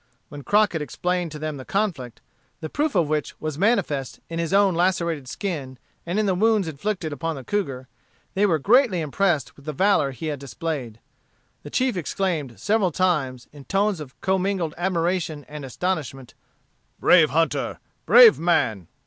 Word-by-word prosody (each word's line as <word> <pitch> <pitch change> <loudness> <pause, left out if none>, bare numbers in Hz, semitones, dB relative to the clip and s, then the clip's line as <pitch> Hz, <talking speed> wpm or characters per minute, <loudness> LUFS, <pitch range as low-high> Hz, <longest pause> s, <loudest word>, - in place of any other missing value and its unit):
When 145 - -9
Crockett 205 -1 +2
explained 175 +4 -2
to 150 - -7
them 155 -1 -4
the 130 - -8
conflict, 165 - -2 0.4
the 155 - -6
proof 295 -2 -1
of 170 -4 +3
which 150 -1 -2
was 155 -1 -4
manifest 185 - 0
in 165 0 -4
his 170 0 -2
own 195 -1 +4
lacerated 170 -5 0
skin, 140 -6 -5 0.3
and 175 +4 -1
in 215 - +2
the 195 - +2
wounds 210 0 +2
inflicted 160 +1 -3
upon 165 +3 -3
the 135 - -8
cougar, 135 -9 -3 0.5
they 205 +1 +3
were 165 -5 +2
greatly 215 - +3
impressed 160 -1 0
with 140 - -18
the 155 - -4
valor 185 -3 +3
he 135 +4 -7
had 150 -3 -3
displayed. 130 -2 -5 0.6
The 145 - -9
chief 255 - 0
exclaimed 165 - -2
several 205 -4 +1
times, 145 -9 0
in 145 -2 -13
tones 200 -1 +1
of 130 -5 -10
commingled 190 -3 0
admiration 175 -4 -1
and 150 -1 -8
astonishment, 135 -3 -4 0.7
"Brave 165 -4 +6
hunter! 165 +4 0 0.3
brave 475 -3 +8
man!" 110 - +1
165 Hz, 165 wpm, -23 LUFS, 145-190 Hz, 0.7 s, brave